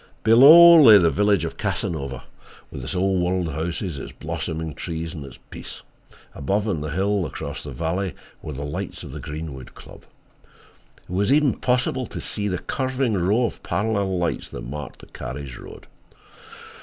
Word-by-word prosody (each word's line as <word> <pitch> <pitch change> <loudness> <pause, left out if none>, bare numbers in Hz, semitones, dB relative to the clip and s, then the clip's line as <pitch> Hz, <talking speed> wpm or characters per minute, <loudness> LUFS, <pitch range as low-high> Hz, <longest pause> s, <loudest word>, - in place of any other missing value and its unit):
Below 155 +9 +9
lay 110 -7 +9
the 85 -4 +3
village 100 -4 +2
of 80 - -6
Casanova, 85 - -3 0.5
with 65 - -7
its 65 +3 -4
Old 95 0 +1
World 90 -1 0
houses, 85 0 -3
its - - -8
blossoming 80 -1 -5
trees 80 +2 -5
and 75 - -7
its 70 - -11
peace. - - -9 0.5
Above 100 +10 -1
on 85 -8 -1
the 75 - -4
hill 95 +4 0
across - - -6
the - - -8
valley 90 +3 -3 0.3
were 75 - -7
the 70 +2 -5
lights 75 - -5
of - - -9
the - - -7
Greenwood 75 -4 -8
Club. - - -14 1.0
It - - -13
was 100 +6 +1
even 145 -2 +4
possible 125 0 0
to - - -7
see 105 -1 -3
the 90 -2 -1
curving 130 +3 -2
row 100 +6 +2
of 115 - -5
parallel 100 0 -1
lights 85 -1 -2
that - - -8
marked 75 +2 -8
the - - -13
carriage 65 -1 -7
road. - - -12
90 Hz, 170 wpm, -23 LUFS, 80-105 Hz, 1.0 s, Below